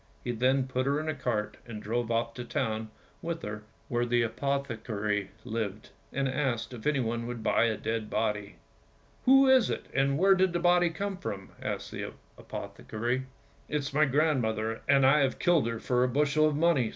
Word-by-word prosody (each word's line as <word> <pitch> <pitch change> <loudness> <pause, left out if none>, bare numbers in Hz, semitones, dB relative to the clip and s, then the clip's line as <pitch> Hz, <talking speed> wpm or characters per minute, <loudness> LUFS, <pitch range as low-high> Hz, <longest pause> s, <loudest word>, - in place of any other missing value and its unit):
He 120 - -1
then 130 +3 +2
put 130 0 -1
her 140 +1 +2
in 155 - -4
a 155 - 0
cart 120 -6 -2
and 110 -2 -6
drove 115 +2 -2
off 115 0 0
to 125 - -6
the - - -15
town 110 -6 -1 0.3
with 170 0 -4
her 105 0 -5 0.3
where 120 0 0
the 120 0 +2
apothecary 110 -6 -2 0.2
lived, 110 -3 -4 0.2
and 135 0 0
asked 130 -3 -1
if 115 -3 -9
he 150 -2 +2
would 115 -1 -3
buy 115 - +3
a 110 -2 0
dead 110 -1 -3
body. 105 -2 -1 0.3
" - - -33
Who 270 +1 +7
is 260 -3 +5
it, - - -3
and 140 0 +2
where 195 +4 +6
did 190 -1 +2
the 175 - +1
body 175 0 +4
come 195 +4 -3
from? 100 - -6
" - - -20
asked - - -4
the - - -5 0.2
apothecary. 120 +4 -4 0.4
"It - - -3
is 145 -2 -2
my 155 +2 +4
grandmother, 120 -7 +1
and 135 -1 +5
I 140 +3 +6
have 135 -2 +1
killed 170 -8 +3
her 115 -1 -3
for 125 +2 +1
a - - +3
bushel 150 +3 +3
of 150 - 0
money! 150 -7 +3
125 Hz, 200 wpm, -29 LUFS, 115-150 Hz, 0.4 s, Who